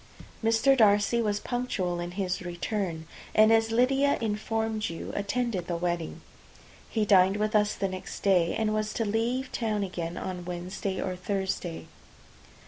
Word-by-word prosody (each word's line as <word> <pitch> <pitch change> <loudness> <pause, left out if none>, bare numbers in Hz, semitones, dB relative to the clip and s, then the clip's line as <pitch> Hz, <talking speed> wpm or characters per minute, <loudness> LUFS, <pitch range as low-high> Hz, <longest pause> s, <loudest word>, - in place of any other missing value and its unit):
Mr. 225 +5 +4
Darcy 210 0 +4
was 205 -2 0
punctual 205 -9 -2
in 175 0 -3
his 185 -2 -1
return, 175 -1 -3 0.3
and, 215 +1 +7
as 225 0 +3
Lydia 270 +4 +3
imformed 220 0 -1
you, 165 - -6
attended 200 -2 -1
the 175 - -1
wedding. 170 -1 -2 0.7
He 220 -2 0
dined 195 0 +5
with 215 +1 0
us 210 0 +3
the 195 - -1
next 185 -1 -7
day, 180 -4 +3
and 215 -1 +1
was 215 0 -1
to 225 - 0
leave 235 +5 -1
town 215 -3 -1
again 175 -3 -4
on 180 -1 -4
Wednesday 180 +2 -4
or 185 - -2
Thursday. 190 -2 -3
205 Hz, 150 wpm, -28 LUFS, 180-225 Hz, 0.7 s, and